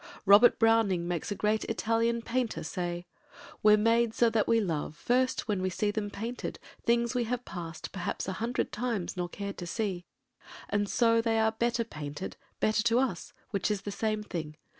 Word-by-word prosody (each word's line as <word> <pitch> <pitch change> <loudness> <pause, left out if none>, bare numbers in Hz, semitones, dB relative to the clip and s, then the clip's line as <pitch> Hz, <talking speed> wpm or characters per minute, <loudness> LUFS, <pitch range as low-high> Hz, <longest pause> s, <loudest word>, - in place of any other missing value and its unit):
Robert 205 +5 +7
Browning 225 -6 +3
makes 175 -3 -2
a - - -1
great 215 +2 +1
Italian 230 +1 0
painter 240 -1 -1
say— 175 +2 -3 0.6
We're 210 0 +7
made 230 +1 +2
so 235 -1 +4
that 220 -2 +1
we 230 0 +4
love 160 -7 -2
First 255 +9 +1
when 205 -4 0
we 185 - 0
see 205 +3 0
them 205 -1 -2
painted, 230 +5 -5 0.3
things 235 +1 +2
we 245 -2 0
have 245 +1 -3
passed 165 -3 -7
Perhaps 190 -1 -3
a 190 - -2
hundred 240 +2 -1
times 220 -5 -2
nor 175 -1 -2
cared 200 +2 -6
to 175 - -5
see; 185 -2 -3 0.6
And 205 0 0
so 230 -1 +3
they 225 -1 +1
are 220 0 +3
better 235 +1 0
painted—better 185 +5 -3
to 230 +1 +3
us, 255 -2 -1 0.2
Which 200 -1 0
is 205 -2 -1
the 205 - -4
same 215 0 -1
thing. 155 -6 -5
215 Hz, 180 wpm, -30 LUFS, 185-230 Hz, 0.6 s, Robert